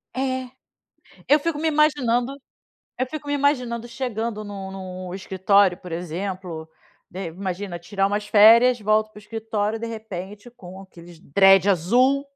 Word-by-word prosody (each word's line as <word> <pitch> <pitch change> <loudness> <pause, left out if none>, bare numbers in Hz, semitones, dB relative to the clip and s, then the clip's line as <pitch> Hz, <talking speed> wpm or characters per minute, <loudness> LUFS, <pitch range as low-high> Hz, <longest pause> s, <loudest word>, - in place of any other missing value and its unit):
É, 260 -1 -2 0.8
eu 295 +1 +5
fico 325 0 -2
me 320 - 0
imaginando 275 -4 +1 0.6
eu 255 - 0
fico 295 +1 -8
me 290 - -1
imaginando 250 -5 0
chegando 230 -3 -4
no 195 -2 -7 0.4
no - - -7
escritório, 190 0 +2
por 180 -3 -11
exemplo, 175 -1 -5 0.4
de 185 -1 -5
imagina 185 +1 -5
tirar 195 +3 -1
umas 205 +1 -2
férias, 230 +3 +6
volto 215 +1 +1
para 210 - -17
o - - -11
escritório, 220 0 -3
de 230 - -4
repente 210 0 -8
com 190 -6 -12
aqueles 175 -3 -15
dreads 195 +5 +5
azul. 245 - +3
210 Hz, 145 wpm, -23 LUFS, 190-245 Hz, 0.8 s, férias